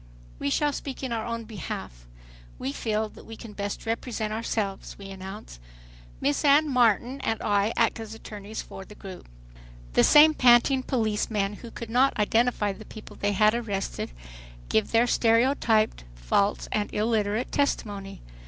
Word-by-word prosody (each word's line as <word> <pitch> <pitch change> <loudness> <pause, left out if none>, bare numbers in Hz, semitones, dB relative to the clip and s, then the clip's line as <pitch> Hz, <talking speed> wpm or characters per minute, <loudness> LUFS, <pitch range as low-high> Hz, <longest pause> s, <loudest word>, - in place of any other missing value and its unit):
"We - - -1
shall 295 - +1
speak 275 -1 -6
in 260 - -3
our 225 -1 -2
own 230 0 -3
behalf. 160 - -7 0.5
We 135 - -3
feel 215 +6 -1
that - - -14
we 225 0 -10
can 225 -2 -10
best 200 +1 -5
represent 225 -1 -2
ourselves," 215 -3 -3
we 195 -1 -9
announce. 190 - -9 0.6
Miss 145 - 0
Anne 295 +2 +5
Martin 245 +2 +2
and 225 - 0
I 205 +1 +2
act 230 0 +2
as 220 -1 -7
attorneys 210 -1 -7
for 195 - -9
the 210 - -14
group. 190 - -10 0.6
The - - +5
same 305 +1 +8
panting 250 +1 +5
policemen 215 -5 -1
who 235 - -10
could 230 0 -8
not 255 +2 +3
identify 215 -1 +2
the 215 - -11
people 215 0 -11
they 205 0 0
had 215 +2 +4
arrested 210 -5 -3 0.6
give 110 - +2
their 230 +1 +4
stereotyped, 230 - +2
false - - 0
and 210 -1 -1
illiterate 215 +1 0
testimony. 200 -8 -2
220 Hz, 155 wpm, -26 LUFS, 200-235 Hz, 0.6 s, same